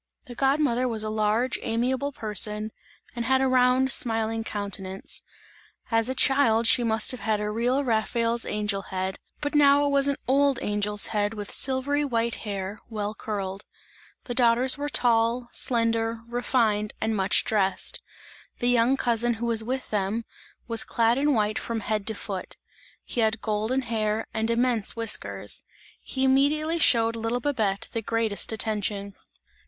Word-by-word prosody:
The 245 - -9
god 270 +4 +1
mother 255 -4 +1
was 225 -3 -1
a 215 - -3
large 215 +3 0
amiable 255 +5 -1
person 215 -2 -1 0.4
and 235 - -3
had 265 +3 +2
a 265 - +2
round 255 +1 +3
smiling 225 -3 +2
countenance; 200 -3 -3 0.7
as 225 +1 +1
a 260 - -2
child 255 -4 +3
she 245 +1 +5
must 220 -1 +3
have 255 - -6
had 215 0 -1
a 210 0 -2
real 245 +5 0
Raphael's 230 0 0
angel 210 -1 -2
head, 190 0 -4 0.2
but 290 +1 -2
now 285 -1 +5
it - - +1
was 280 0 +3
an 280 - +1
old 275 0 +3
angel's 210 -2 -1
head 205 +1 0
with 205 -1 -6
silvery 275 +2 +2
white 235 -4 -1
hair, 200 -1 -5
well 210 -2 -3
curled. 200 -2 -5 0.6
The 245 - -5
daughters 245 +1 +3
were 290 0 -4
tall, 235 -2 +1
slender, 230 -1 0
refined 230 -3 0
and 220 0 -1
much 195 -1 +2
dressed. 195 -3 0 0.6
The 245 - 0
young 245 +2 +3
cousin 240 -1 +1
who 230 +1 -4
was 230 -2 +2
with 255 +3 -4
them, 210 +2 -1 0.4
was 230 -1 +3
clad 230 +2 +1
in 290 -1 +2
white 215 -1 0
from 230 -1 -4
head 215 -1 -2
to 220 - -1
foot; 195 -2 -6 0.5
he - - -4
had 220 0 +1
golden 220 +5 -1
hair 220 -2 -1
and 220 0 -1
immense 235 -2 +1
whiskers; 230 -2 -2 0.4
he 265 - -3
immediately 300 +5 +2
showed 230 -6 +4
little 230 +2 -2
Babette 220 -9 -1
the 230 - -1
greatest 225 -1 0
attention. 205 -2 -2
230 Hz, 160 wpm, -25 LUFS, 215-255 Hz, 0.7 s, she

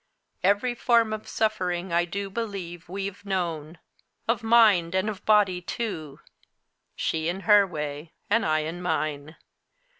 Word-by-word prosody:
Every 205 +6 +2
form 235 -2 +2
of 215 - -6
suffering 185 -5 -1
I 170 0 +3
do 195 +3 -5
believe 190 -7 -5
we've 195 +1 -5
known 170 -5 -3 0.5
of 230 +1 +1
mind 215 -7 +4
and 190 +2 +1
of 205 -1 -11
body 200 -4 +4
too 165 -8 -5 0.8
she 160 0 -1
in 185 +3 -3
her 205 -1 +5
way, 150 -1 -5 0.2
and 230 +3 +2
I 155 -1 +2
in 165 +3 -5
mine. 155 -3 -2
185 Hz, 140 wpm, -26 LUFS, 165-210 Hz, 0.8 s, her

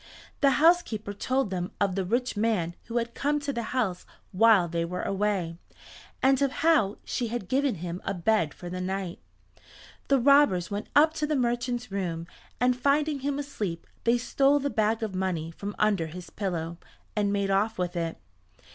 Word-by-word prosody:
The 275 -2 +4
housekeeper 295 -11 +3
told 255 +1 -1
them 180 -1 -2
of 200 -2 +1
the 195 0 -1
rich 240 +7 -1
man 205 -6 0
who 235 0 -3
had 235 0 -1
come 295 +1 0
to 285 -1 -2
the 235 - -2
house 215 -9 -1 0.3
while 200 -2 +5
they 170 0 -1
were 180 +2 -4
away, 195 -4 -1 0.6
and 270 0 +4
of 275 -2 +2
how 290 -12 +4
she 245 - -2
had 225 -4 -4
given 270 0 +1
him 175 +1 -5
a 195 - -2
bed 180 -3 +1
for 175 - -10
the 185 +1 -4
night. 190 -1 -3 0.9
The 275 - +4
robbers 260 -9 +4
went 205 +1 -3
up 310 +2 +6
to 305 -2 -2
the 305 - 0
merchant's 240 -2 -1
room 170 -4 -3 0.3
and 250 0 +3
finding 285 +3 +1
him 280 +1 -2
asleep 210 -12 -4 0.2
they 235 +1 +3
stole 275 +3 +3
the 285 0 -1
bag 220 +1 +1
of 215 -3 -3
money 180 -4 -2
from 200 +4 -6
under 200 -6 +2
his 180 +3 -9
pillow, 170 -4 -3 0.4
and 205 -1 +1
made 200 -1 0
off 210 +3 +1
with 180 0 -2
it. 165 -1 -2
210 Hz, 180 wpm, -27 LUFS, 180-260 Hz, 0.9 s, up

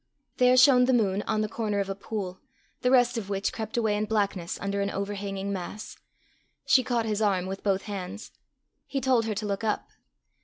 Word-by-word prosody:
There 250 0 +5
shone 255 -1 +7
the 260 - +2
moon 200 -4 +1
on 215 - +1
the 215 - 0
corner 210 -2 -2
of 200 - -1
a 195 - -2
pool, 195 -2 -5 0.4
the 250 - +2
rest 245 -2 +4
of 200 -3 -8
which 195 -1 -1
crept 220 0 -5
away 220 -3 +2
in 210 +1 0
blackness 200 -5 -1
under 200 0 -2
an 200 - 0
overhanging 200 0 -3
mass. 195 +3 -6 0.7
She 260 -1 +5
caught 235 -1 0
his 215 -1 -1
arm 195 -4 +2
with 190 +1 -5
both 195 -1 0
hands. 200 0 -6 0.6
He 275 - -2
told 255 -4 +2
her 215 -2 -2
to 210 +2 -3
look 200 +1 -2
up. 215 -1 -1
210 Hz, 200 wpm, -27 LUFS, 195-230 Hz, 0.7 s, shone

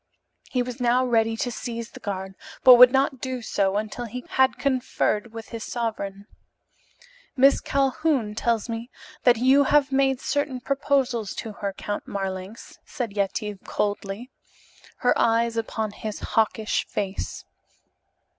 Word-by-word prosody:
He 250 -1 0
was 250 +1 -7
now 245 +1 +3
ready 225 -2 +2
to 245 - -2
seize 235 -1 -5
the - - -11
guard, 190 -2 -5 0.3
but 255 - +10
would 250 0 +9
not 265 -1 +1
do 255 -2 -4
so 195 -2 0
until 215 +3 -4
he 250 +2 -7
had 265 0 +3
conferred 250 -4 0
with 225 -1 -9
his 230 -1 -6
sovereign. 205 -4 -4 1.1
"Miss 275 +2 +5
Calhoun 270 -4 0
tells 230 0 0
me 230 +1 -5 0.4
that 245 -2 +6
you 265 +4 +5
have 290 0 +3
made 270 -1 +2
certain 285 -2 -1
proposals 265 -4 0
to 225 - -5
her, 200 -1 -3
Count 205 +1 -5
Marlanx," 195 +2 -6
said 230 -5 -5
Yetive 205 0 -2
coldly, 205 +4 -3 0.7
her 245 - +4
eyes 230 0 +2
upon 220 -1 -2
his 215 0 -6
hawkish 220 0 0
face. 195 -1 -4
235 Hz, 140 wpm, -25 LUFS, 210-255 Hz, 1.1 s, but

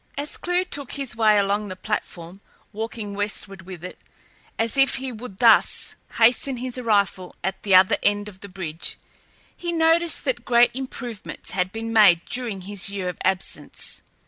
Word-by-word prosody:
As 290 +1 -4
Clewe 355 0 0
took 285 -7 -5
his 275 -4 -4
way 215 -2 +4
along 200 +1 +1
the 185 - -6
platform, 185 -2 -5 0.3
walking 220 -1 -5
westward 200 -1 -4
with 180 -3 -9
it, 180 - -8 0.6
as 225 +3 0
if 270 -1 +4
he 265 0 -4
would 225 -4 -9
thus 230 -1 +4 0.2
hasten 245 +3 +4
his 250 0 -4
arrival 200 -6 0
at 190 +1 -2
the 195 -2 +3
other 185 0 +6
end 205 0 +1
of 195 -3 -11
the 200 - -10
bridge, 175 -3 -5 0.6
he 345 -1 -4
noticed 330 0 +2
that 245 -3 -1
great 240 0 +5
improvements 245 -4 -6
had 185 0 -1
been 225 +1 -4
made 195 -6 +6
during 235 -6 -4
his 200 +2 -1
year 195 -2 -3
of 180 - -7
absence. 190 -1 -1
215 Hz, 170 wpm, -23 LUFS, 190-250 Hz, 0.6 s, other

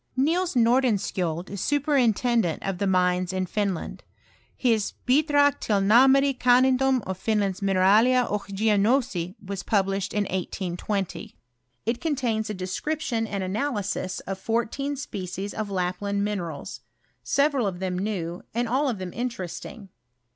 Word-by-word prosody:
Nils 335 +5 +1
Nordenskiold 210 -9 +1
is 200 -2 -5
superintendent 245 - +1
of 195 -2 -3
the 200 - 0
mines 180 -1 +2
in 185 0 -1
Finland; 195 -2 -3 0.6
his 225 -5 +1
" - - -40
Bidrag 285 +1 +3
till 205 -2 +1
narmare 265 +7 +5
kannedom 255 0 +4
af 190 0 -5
Fmland's 205 -4 0
Mineralieroch 205 +3 +3
Geognosie" 205 -2 +1
was 195 -1 -4
published 195 -1 0
in 210 - 0
1820. 190 +1 -4 0.5
It 230 +2 -1
contains 245 -9 -1
a 210 - -3
description 225 +5 -2
and 200 -2 -3
analysis 205 -2 -2
of 195 0 -5
fourteen 235 +7 -1
species 195 -7 -5
of 215 -2 -4
Lapland 195 +2 -1
minerals, 175 -8 -4 0.4
several 280 -5 +1
of 185 -2 -3
them 185 0 -3
new, 180 -4 -3
and 240 0 0
all 265 +4 +1
ofthem 185 -5 -6
interesting 225 -3 -5
210 Hz, 125 wpm, -25 LUFS, 190-250 Hz, 0.6 s, narmare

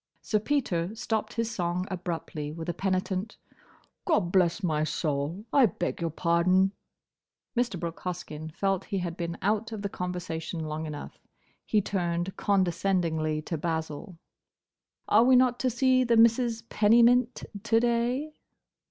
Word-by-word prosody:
Sir 215 - +1
Peter 210 -7 -1
stopped 225 -1 -2
his 230 -1 -1
song 180 -3 -1
abruptly, 170 -4 -4
with 160 +1 -7
a 175 - -1
penitent, 190 +2 -2 0.7
"Gobblessmysoul! 170 - 0
I 275 -4 +6
beg 175 -2 -3
your 165 - 0
pardon!" 175 +4 +2 0.8
Mr. 240 -7 0
Brooke 170 -1 -5
Hoskyn 160 -4 -5
felt 195 -1 0
he 200 - -3
had 175 -2 -3
been 170 -1 -4
out 215 +3 0
of 215 -2 -5
the 200 - -1
conversation 175 -3 -4
long 155 +1 -4
enough. 150 -1 -8 0.5
He 215 - +3
turned 175 -2 -2
condescendingly 175 -5 0
to 165 0 -4
Basil. 160 +1 -4 0.9
"Are 220 +2 +5
we 255 +1 +6
not 250 -1 +4
to 255 - +1
see 255 +1 +3
the 235 -2 +3
Misses 230 0 +4
Pennymint 235 +3 +4 0.2
to 225 +1 +3
day?" 240 +5 0
185 Hz, 135 wpm, -28 LUFS, 170-230 Hz, 0.9 s, I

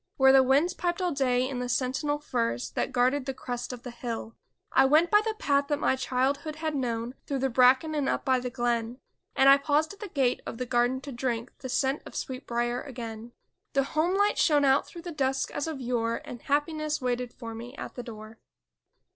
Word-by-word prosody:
Where 265 0 +6
the 270 - +8
winds 275 +7 +3
piped 345 0 -2
all 360 -1 0
day 255 -3 +1
in 260 -2 -4
the 250 0 -3
sentinel 270 +4 0
firs 120 - -2
That - - -2
guarded 255 +2 +1
the 270 - -3
crest 245 -1 -5
of 245 -2 -8
the 245 - -6
hill; 230 -1 -5 0.4
I - - +5
went 305 +6 +4
by 420 0 +6
the 440 0 -2
path 280 -8 +1
that 290 -1 0
my 275 - +2
childhood 270 +4 -1
had 315 0 -3
known 240 -3 -2
Through 280 - -1
the 265 0 0
bracken 260 +6 +4
and 290 -3 0
up - - -1
by 260 -1 +3
the 250 0 -4
glen. 240 -1 -1 0.4
And 270 - +5
I 275 0 +9
paused 300 +4 +1
at 400 - -16
the 420 - -6
gate 270 -8 0
of - - -5
the 250 - -3
garden 245 +2 +1
to 280 - -8
drink 240 -1 -3
The 260 - -6
scent 265 +3 0
of - - -12
sweet 260 +1 -5
briar 240 +1 -1
again; 235 -3 -8 0.4
The 275 - +3
homelight 365 +9 +1
shone 295 -3 +4
out 270 +1 +3
through 340 - -10
the 350 - -5
dusk 270 -3 -1
as 290 - -3
of 315 -4 -4
yore 235 -2 -1
And 240 - -8
happiness 300 +1 0
waited 250 -2 -2
for 230 -3 -8
me 235 +4 -8
at - - -7
the 245 - -6
door! 220 -2 -10
265 Hz, 220 wpm, -28 LUFS, 245-290 Hz, 0.4 s, I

